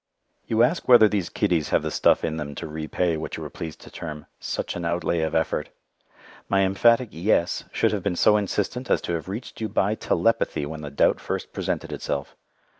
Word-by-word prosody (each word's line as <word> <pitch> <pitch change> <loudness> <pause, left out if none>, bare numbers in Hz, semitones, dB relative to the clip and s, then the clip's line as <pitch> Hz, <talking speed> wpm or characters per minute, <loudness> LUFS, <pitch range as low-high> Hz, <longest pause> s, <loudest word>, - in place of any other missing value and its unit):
You 115 +1 +3
ask 165 +8 +1
whether 120 -3 +8
these 100 -4 -1
kiddies 90 -7 0
have - - +2
the - - -2
stuff - - +3
in 80 -1 -1
them 75 -2 -5
to - - -5
repay 80 +2 -1
what 80 - -5
you - - -6
are - - -7
pleased 80 -2 -7
to - - -13
term 75 -2 -7
"such - - -3
an 85 - -4
outlay 85 0 0
of 80 -1 -1
effort." 80 0 0 0.8
My 95 0 +3
emphatic 115 +5 +3
"yes" 85 0 +1
should 115 - +2
have 105 -2 -1
been 90 - -1
so 105 - +5
insistent 105 +5 -1
as - - +3
to 85 - -3
have 85 +2 -4
reached 110 +3 -7
you 110 - -1
by 100 +2 +1
telepathy 110 -8 +1
when 80 +1 -6
the 75 - -6
doubt 70 - +2
first - - -4
presented - - -3
itself. 70 -1 -4
90 Hz, 205 wpm, -25 LUFS, 80-105 Hz, 0.8 s, whether